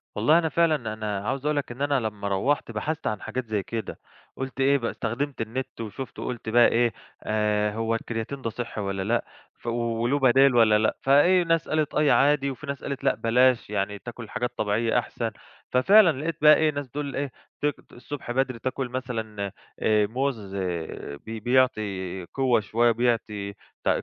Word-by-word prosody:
والله 155 Hz, +3 st, +4 dB
أنا 160 Hz, -2 st, 0 dB
فعلًا 150 Hz, -11 st, +1 dB
أنا 105 Hz, -2 st, -3 dB
عاوز 135 Hz, +3 st, -2 dB
أقول 150 Hz, 0 st, +1 dB
لك 145 Hz, -, -2 dB
إن 125 Hz, +3 st, -9 dB
أنا 145 Hz, -2 st, +2 dB
لمّا 105 Hz, -3 st, -4 dB
روحت 115 Hz, +7 st, 0 dB
بحثت 150 Hz, +9 st, -3 dB
عن 105 Hz, -2 st, -2 dB
حاجات 120 Hz, +3 st, -4 dB
زي 105 Hz, -3 st, -2 dB
كده، 115 Hz, +3 st, -5 dB, 0.4 s
قُلت 135 Hz, 0 st, -6 dB
إيه 135 Hz, +1 st, +4 dB
يبقى 120 Hz, -4 st, 0 dB
استخدمت 130 Hz, +4 st, -3 dB
النت، 125 Hz, +2 st, -4 dB
وشُفت 115 Hz, +4 st, -7 dB
وقُلت 120 Hz, -3 st, -4 dB
بقى 120 Hz, +1 st, +6 dB
إيه 120 Hz, -2 st, +2 dB, 0.3 s
آآ 105 Hz, -1 st, +1 dB
هو 115 Hz, +1 st, -1 dB
الكرياتين 115 Hz, +4 st, -4 dB
ده 115 Hz, -, -2 dB
صحي 115 Hz, -2 st, -5 dB
والّا 100 Hz, -1 st, -2 dB
لأ، 115 Hz, +4 st, 0 dB, 0.3 s
ف -, -, -13 dB
وله 115 Hz, +3 st, 0 dB
بدايل 135 Hz, 0 st, +5 dB
والّا 110 Hz, -2 st, +6 dB
لأ، 110 Hz, +1 st, +1 dB
فإيه 175 Hz, +7 st, +5 dB
ناس 165 Hz, -1 st, +1 dB
قالت 155 Hz, -1 st, 0 dB
أي 150 Hz, -1 st, +4 dB
عادي، 140 Hz, 0 st, +3 dB
وفي 140 Hz, +3 st, -9 dB
ناس 140 Hz, -1 st, -5 dB
قالت 140 Hz, -1 st, -4 dB
لأ، -, -, +3 dB
بلاش 125 Hz, +1 st, +3 dB
يعني 105 Hz, 0 st, -2 dB
تاكل 120 Hz, -2 st, -9 dB
حاجات 125 Hz, -1 st, -2 dB
طبيعية 110 Hz, +3 st, +1 dB
أحسن، 115 Hz, -1 st, -4 dB, 0.4 s
ففعلًا 165 Hz, +3 st, +5 dB
لقيت 160 Hz, 0 st, -2 dB
بقى 150 Hz, 0 st, +8 dB
إيه 155 Hz, -1 st, +2 dB
ناس 145 Hz, -2 st, -5 dB
بتقول 140 Hz, +2 st, -5 dB
إيه 140 Hz, -2 st, -2 dB, 0.3 s
ت -, -, 0 dB, 0.3 s
الصُّبح 130 Hz, 0 st, -7 dB
بدري 130 Hz, -1 st, 0 dB
تاكل 130 Hz, +1 st, -3 dB
مثلًا 110 Hz, -6 st, -4 dB, 0.3 s
آآ 105 Hz, -1 st, +3 dB
موز 115 Hz, -5 st, -3 dB
آآ 85 Hz, -6 st, -4 dB
بي 110 Hz, 0 st, -5 dB
بيعطي 105 Hz, -7 st, 0 dB
قوة 130 Hz, +4 st, +1 dB
شوية، 115 Hz, +3 st, +2 dB
بيعطي 110 Hz, -4 st, -1 dB, 0.3 s
ت -, -, +1 dB
120 Hz, 180 wpm, -26 LUFS, 110-140 Hz, 0.4 s, بقى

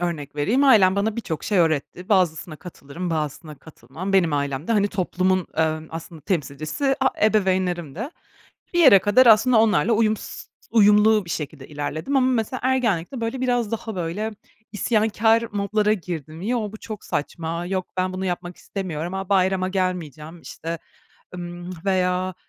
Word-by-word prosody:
örnek 155 Hz, -5 st, -4 dB
vereyim, 225 Hz, -, +2 dB
ailem 200 Hz, -8 st, +6 dB
bana 210 Hz, +2 st, 0 dB
birçok 175 Hz, -9 st, -4 dB
şey 205 Hz, -2 st, +1 dB
öğretti. 165 Hz, +2 st, 0 dB
Bazısına 175 Hz, -5 st, +1 dB
katılırım, 170 Hz, +1 st, -7 dB
bazısına 155 Hz, 0 st, -3 dB
katılmam. 170 Hz, +5 st, -8 dB
Benim 175 Hz, -5 st, +3 dB
ailem 140 Hz, +1 st, -2 dB
de, -, -, +1 dB
hani, 205 Hz, -2 st, +2 dB
toplumun, 185 Hz, -1 st, 0 dB
emm, 160 Hz, 0 st, 0 dB
aslında, 165 Hz, 0 st, -8 dB
temsilcisi 160 Hz, -, -1 dB
a 265 Hz, -, +4 dB, 0.2 s
ebeveynlerimdi. 185 Hz, -, 0 dB, 0.7 s
Bir 345 Hz, -, +3 dB
yere 265 Hz, -11 st, +8 dB
kadar, 205 Hz, +7 st, +4 dB
aslında, 225 Hz, +1 st, +6 dB
onlarla 220 Hz, -2 st, +3 dB
uyums 220 Hz, -1 st, -1 dB, 0.2 s
uyumlu 210 Hz, -1 st, +5 dB
bir 170 Hz, -, -9 dB
şekilde 150 Hz, -4 st, -5 dB
ilerledim 155 Hz, -, -3 dB
ama, 260 Hz, -1 st, +4 dB
mesela 240 Hz, +2 st, -1 dB
ergenlikte, 245 Hz, -4 st, 0 dB
böyle, 230 Hz, +3 st, -3 dB
biraz 245 Hz, -4 st, 0 dB
daha 225 Hz, -1 st, -4 dB
böyle, 185 Hz, +6 st, -3 dB, 0.4 s
isyankâr 220 Hz, +1 st, +2 dB
modlara 210 Hz, +1 st, +1 dB
girdim. 165 Hz, -5 st, -5 dB
Yo, 215 Hz, -1 st, -1 dB
bu -, -, -7 dB
çok 215 Hz, -1 st, -8 dB
saçma, 165 Hz, +3 st, -3 dB
yok, 185 Hz, 0 st, -2 dB
ben 185 Hz, 0 st, 0 dB
bunu 185 Hz, +1 st, -4 dB
yapmak 175 Hz, -1 st, -4 dB
istemiyorum. 175 Hz, -3 st, -5 dB
A, 190 Hz, -1 st, -4 dB
bayrama 190 Hz, -1 st, +2 dB
gelmeyeceğim. 175 Hz, -4 st, -3 dB
İşte, 165 Hz, +1 st, -6 dB, 0.6 s
ımm, 175 Hz, 0 st, -7 dB
veya 185 Hz, -1 st, 0 dB
185 Hz, 150 wpm, -23 LUFS, 165-215 Hz, 0.7 s, yere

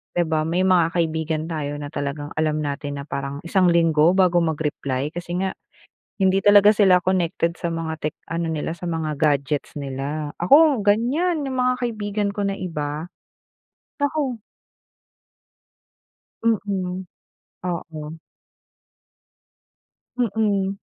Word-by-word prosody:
'di 175 Hz, -, +3 dB
ba 155 Hz, -1 st, +1 dB
may 180 Hz, +3 st, +1 dB
mga 180 Hz, -3 st, +3 dB
kaibigan 160 Hz, -1 st, -1 dB
tayo 145 Hz, -2 st, -3 dB
na 145 Hz, -1 st, -6 dB
talagang 145 Hz, +1 st, -4 dB
alam 155 Hz, -1 st, +1 dB
natin 145 Hz, 0 st, -4 dB
na -, -, -9 dB
parang 140 Hz, +1 st, -4 dB
isang 185 Hz, +1 st, +3 dB
linggo 165 Hz, -1 st, +4 dB
bago 180 Hz, -2 st, +4 dB
mag-reply 150 Hz, -3 st, -2 dB
kasi 175 Hz, 0 st, -4 dB
nga 190 Hz, -, 0 dB, 0.7 s
hindi 190 Hz, +1 st, +3 dB
talaga 205 Hz, 0 st, +7 dB
sila 190 Hz, -3 st, +5 dB
connected 170 Hz, -2 st, 0 dB
sa 170 Hz, -, -2 dB
mga 165 Hz, -1 st, -3 dB
tech 150 Hz, -, -2 dB
ano 170 Hz, 0 st, -2 dB
nila, 160 Hz, +1 st, -2 dB
sa 175 Hz, -, -7 dB
mga 160 Hz, -2 st, -2 dB
gadgets 145 Hz, -1 st, 0 dB
nila. 145 Hz, +2 st, -4 dB
Ako 280 Hz, -, +6 dB
ganyan 285 Hz, -, +2 dB
yung 260 Hz, -1 st, -3 dB
mga 250 Hz, 0 st, +2 dB
kaibigan 210 Hz, -3 st, -1 dB
ko 205 Hz, -, -3 dB
na 195 Hz, -, -1 dB
iba. 150 Hz, -3 st, -4 dB, 1.0 s
Naku! 285 Hz, -5 st, -1 dB, 2.0 s
Mm. 190 Hz, -4 st, -1 dB, 0.6 s
Oo. 160 Hz, -3 st, -5 dB, 2.0 s
Mm. 200 Hz, -4 st, 0 dB
170 Hz, 125 wpm, -23 LUFS, 155-200 Hz, 2.0 s, talaga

